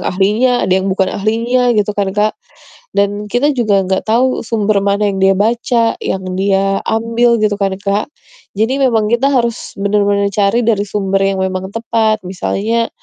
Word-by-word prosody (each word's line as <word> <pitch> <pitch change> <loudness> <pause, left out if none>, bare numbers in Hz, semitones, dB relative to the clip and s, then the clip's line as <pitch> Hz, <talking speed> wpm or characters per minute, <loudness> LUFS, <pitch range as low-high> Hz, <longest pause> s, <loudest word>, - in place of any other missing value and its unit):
yang - - -8
ahlinya, 210 +7 +1
ada 185 - 0
yang 190 - -3
bukan 190 0 0
ahlinya 230 +4 0
gitu 210 0 +1
kan, 200 -1 -1
Kak. 210 +1 +2 0.6
Dan 205 +1 -1
kita 285 +4 +1
juga 215 -6 +2
enggak 190 0 0
tahu 255 +3 +1
sumber 215 -3 0
mana 200 +1 +1
yang 195 -1 -2
dia 195 0 +4
baca, 230 +2 +1
yang 190 -1 -3
dia 195 +1 +1
ambil, 230 +1 +2
gitu 215 -1 +1
kan, 195 -1 0
Kak. 200 +3 -1 0.5
Jadi 255 +6 0
memang 225 -5 +2
kita 245 +4 +2
harus 235 -4 -1
bener-bener 200 0 +1
cari 210 +4 +1
dari 215 -3 +2
sumber 195 -1 -1
yang 195 0 0
memang 190 0 -3
tepat. 225 -1 0
Misalnya, 220 +5 -1
210 Hz, 170 wpm, -15 LUFS, 195-230 Hz, 0.6 s, dia